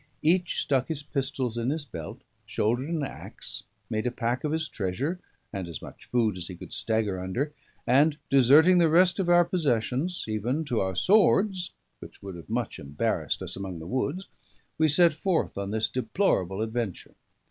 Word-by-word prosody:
Each 175 +2 +2
stuck 135 -2 +1
his 155 -3 -2
pistols 135 -4 -2
in 120 +2 0
his 150 0 -2
belt, 85 - -8 0.2
shouldered 120 +7 0
an 165 -3 -1
axe, 135 - -7 0.3
made 110 +2 -1
a - - 0
pack 120 0 -2
of 150 - -1
his 160 0 -1
treasure 130 - -2 0.3
and 95 -3 -4
as 85 -4 -6
much - - -12
food 110 -6 +1
as 85 - -5
he 90 - -7
could - - -10
stagger 110 -4 0
under; 120 +12 -2 0.3
and 145 +4 +4
deserting 145 +7 +6
the 165 -2 +5
rest 175 +3 +4
of 180 -2 0
our 175 0 +6
possessions, 150 0 0
even 120 +9 -1
to 120 -6 0
our 95 -1 -1
swords, 195 - +3 0.3
which - - -13
would 95 -1 -6
have 85 +1 -11
much 115 0 -2
embarrassed 70 0 -1
us - - -2
among 95 -2 -5
the 80 - -8
woods, 140 - -2 0.5
we 160 - +5
set 165 +2 +5
forth 165 +2 0
on 100 0 -3
this 110 +1 +1
deplorable 110 - 0
adventure. 110 -4 -4
130 Hz, 180 wpm, -27 LUFS, 110-160 Hz, 0.5 s, deserting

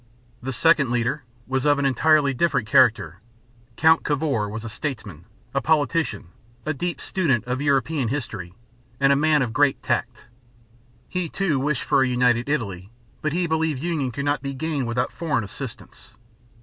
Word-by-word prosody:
The 135 - -4
second 140 -1 +3
leader 120 +3 -1 0.2
was 130 0 -1
of 145 0 +4
an 140 - 0
entirely 140 +1 +3
different 130 -5 0
character. 110 -8 +3 0.6
Count 160 +5 +4
Cavour 145 - 0
(ka 140 -8 0
voor´) - - -6
was 110 +1 -6
a - - -4
statesman, 105 - -6 0.3
a 135 - +1
politician, 150 - 0 0.4
a 155 - 0
deep 175 +5 -3
student 145 - 0
of 125 +2 -2
European 140 -1 +1
history, 110 -9 -5 0.4
and 140 0 +5
a - - +3
man 150 0 +3
of 115 -3 -4
great 145 +1 +2
tact. 120 0 -2 0.8
He, 180 -2 -3
too, 170 -7 0
wished 140 -1 -1
for - - +2
a 130 - +3
united 125 0 +2
Italy, 100 -10 -2 0.3
but 155 - -1
he 175 +3 0
believed 160 -3 -1
union 160 -6 -1
could 140 +4 -4
not 145 0 0
be 140 -1 -5
gained 145 -2 -2
without 120 +1 -1
foreign 150 -8 -1
assistance. 100 - -10
135 Hz, 175 wpm, -23 LUFS, 120-155 Hz, 0.8 s, and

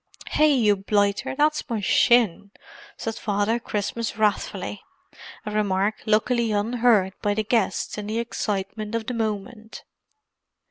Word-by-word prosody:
"Hi, 305 - +3
you 235 -9 +4
blighter, 205 +3 0
that's 300 0 +1
my 230 -2 -1
shin!" 205 -2 +3 0.5
said 225 -1 -4
Father 205 +2 0
Christmas 220 +1 -3
wrathfully; 210 -2 -1 0.6
a 210 - -4
remark 205 0 0
luckily 225 +2 +2
unheard 215 -2 +2
by 205 0 0
the 220 - 0
guests 220 -1 0
in 205 - -6
the 215 +1 -2
excitement 215 -1 -3
of 230 -1 -2
the 250 - -3
moment. 220 0 -4
215 Hz, 130 wpm, -24 LUFS, 205-235 Hz, 0.6 s, you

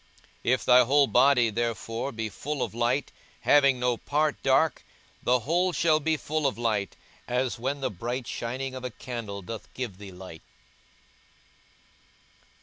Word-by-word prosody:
42:011:036 125 - +3
If - - -8
thy 125 0 +7
whole 140 +4 +4
body 125 -2 +4
therefore 115 +3 -2
be 110 -2 -3
full 140 +7 -4
of - - -4
light, 120 +4 0 0.3
having 140 -3 +4
no 125 -1 +1
part 150 +3 0
dark, 135 +2 +2 0.4
the 125 0 +2
whole 175 +8 +1
shall 155 -1 +3
be 160 +1 0
full 155 0 -1
of 135 - -2
light, 110 -6 -1 0.3
as 125 0 -1
when 135 +3 -2
the 130 -2 -1
bright 120 +6 -4
shining 130 +4 -4
of 130 -1 -7
a 125 - -2
candle 110 -5 -6
doth 115 +4 -8
give 115 -7 -5
thee 100 -2 -9
light. 90 -3 -11
125 Hz, 155 wpm, -27 LUFS, 115-140 Hz, 0.4 s, thy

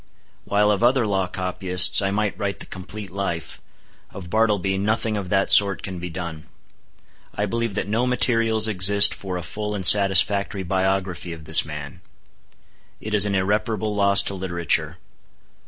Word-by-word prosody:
While 105 +1 +1
of 100 +1 -2
other 125 0 +2
law 95 -3 -1
copyists 90 0 +2
I 95 - -1
might 105 +1 -2
write 100 -1 -4
the - - -8
complete 95 +1 -10
life, 95 -4 -6 0.5
of 90 -3 -11
Bartleby 100 -4 0
nothing 110 +2 -1
of 100 -3 -6
that 95 0 +1
sort 100 -2 +5
can 95 -2 -7
be 90 +1 -7
done. 85 -3 -8 0.9
I 105 - -2
believe 115 0 -4
that 105 - -3
no 115 +4 -1
materials 115 -3 +2
exist 100 0 +5
for 95 -2 -7
a 90 - -7
full 105 +2 -6
and 95 -2 -3
satisfactory 100 0 +4
biography 95 -1 -3
of 80 -2 -13
this 80 +1 +5
man. 75 +2 -10 1.0
It 110 - -7
is 105 -1 +5
an 100 - -2
irreparable 105 +2 -2
loss 100 -1 +3
to - - -3
literature. 85 -3 -2
100 Hz, 160 wpm, -21 LUFS, 90-105 Hz, 1.0 s, sort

